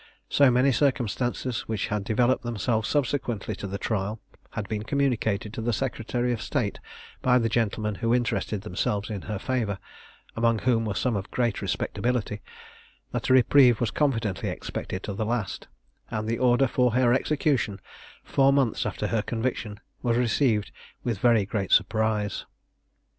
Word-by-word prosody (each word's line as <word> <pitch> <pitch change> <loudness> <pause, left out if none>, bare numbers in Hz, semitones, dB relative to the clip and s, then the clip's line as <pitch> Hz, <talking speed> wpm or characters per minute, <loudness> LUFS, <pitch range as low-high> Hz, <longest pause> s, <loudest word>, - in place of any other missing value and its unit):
So 140 -2 +5
many 125 +3 +4
circumstances, 125 -1 0
which 110 -3 -2
had 105 -1 -1
developed 120 +5 +2
themselves 115 -1 -1
subsequently 125 -7 -1
to 105 - -5
the 100 +1 -4
trial, 105 +1 -2 0.3
had 105 -2 -4
been 105 0 -2
communicated 110 -5 0
to - - -4
the 120 +1 0
secretary 120 0 -1
of 110 - -4
state 120 -9 -2 0.4
by 125 -1 +4
the 115 -2 +1
gentlemen 110 -1 0
who 115 -1 +1
interested 120 -4 0
themselves 105 +1 -2
in 100 -3 -4
her 105 - -1
favour 110 -3 -1 0.6
(among 115 0 +2
whom 115 -1 +1
were 105 -2 -2
some 125 -3 0
of 100 0 -3
great 120 -4 0
respectability), 120 -4 -1 0.7
that - - -2
a - - +6
reprieve 130 -2 +6
was 120 -3 0
confidently 115 -9 0
expected 95 - -5
to 100 - -4
the 100 - -2
last: 110 -3 -2 0.4
and 110 0 -3
the 115 +1 -1
order 125 +1 +4
for 125 -1 +2
her 125 -1 +4
execution, 135 -7 +1 0.4
four 135 0 +3
months 135 -5 +1
after - - -3
her 110 +1 +1
conviction, 115 -2 -3 0.2
was 120 -2 +1
received 120 -3 +2 0.3
with 115 -5 -2
very 115 -3 +4
great 100 -2 -3
surprise. 105 0 +1
115 Hz, 160 wpm, -26 LUFS, 105-125 Hz, 0.7 s, a